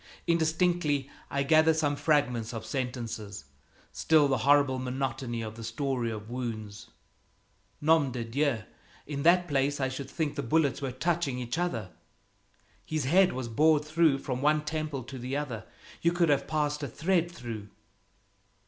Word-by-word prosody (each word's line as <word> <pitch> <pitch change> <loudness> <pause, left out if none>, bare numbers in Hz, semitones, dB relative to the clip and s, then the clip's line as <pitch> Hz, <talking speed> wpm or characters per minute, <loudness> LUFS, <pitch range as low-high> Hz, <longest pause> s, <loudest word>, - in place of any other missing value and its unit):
Indistinctly 160 -4 +1 0.2
I 140 0 0
gather 155 +2 +5
some 145 -2 +1
fragments 125 -7 +1
of 110 - -5
sentences 120 - -4 0.5
still 155 -3 +4
the 135 -3 +1
horrible 140 0 +4
monotony 130 -2 -3
of 110 -1 -6
the 115 - -8
story 120 +1 -2
of 110 -1 -6
wounds: 110 -3 -5 0.9
"Nom 155 -3 +4
de 125 -1 -3
Dieu! 125 0 0 0.4
In 140 -1 -4
that 175 +3 +4
place 145 -1 +1
I 135 -1 0
should 130 0 -6
think 155 -3 -2
the - - -3
bullets 145 +1 +1
were 135 -2 -2
touching 150 0 -1
each 125 +4 -3
other." 115 - -2 0.9
"His 155 +5 -2
head 180 +7 +4
was 130 -2 -4
bored 150 +5 +3
through 155 -2 +3
from 130 -2 -4
one 150 +1 +2
temple 150 -4 -3
to 130 +2 -8
the 130 +3 -3
other. 125 -7 -4 0.4
You 170 +1 +3
could 175 -2 +2
have 145 -2 +2
passed 150 -1 -1
a 145 - -2
thread 170 +6 0
through." 115 -9 -7
140 Hz, 155 wpm, -29 LUFS, 125-155 Hz, 0.9 s, gather